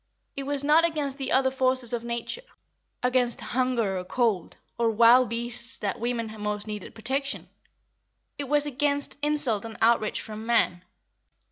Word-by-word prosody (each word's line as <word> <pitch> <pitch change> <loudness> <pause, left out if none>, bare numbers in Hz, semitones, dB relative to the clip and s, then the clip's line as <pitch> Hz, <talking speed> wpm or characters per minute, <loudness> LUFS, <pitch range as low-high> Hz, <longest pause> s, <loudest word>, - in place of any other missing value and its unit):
It 275 0 -5
was 285 -1 0
not 305 +3 +5
against 300 -4 -1
the 270 -1 -3
other 265 0 +3
forces 255 -2 +2
of 235 -1 -2
nature, 235 - -4 0.6
against 250 -1 +2
hunger 240 -7 0
or - - -5
cold, 210 -2 -1 0.2
or 235 -1 +1
wild 235 +2 +6
beasts 235 0 -1
that 200 -2 -3
women 230 -2 -2
most 210 0 -2
needed 210 -3 -7
protection; 270 +5 -1 0.9
it 280 -3 -4
was 295 0 +3
against 285 0 -1
insult 290 -8 0
and 225 -1 -8
outrage 225 -1 +2
from 215 0 -7
man. 225 -6 +1
240 Hz, 150 wpm, -26 LUFS, 225-275 Hz, 0.9 s, wild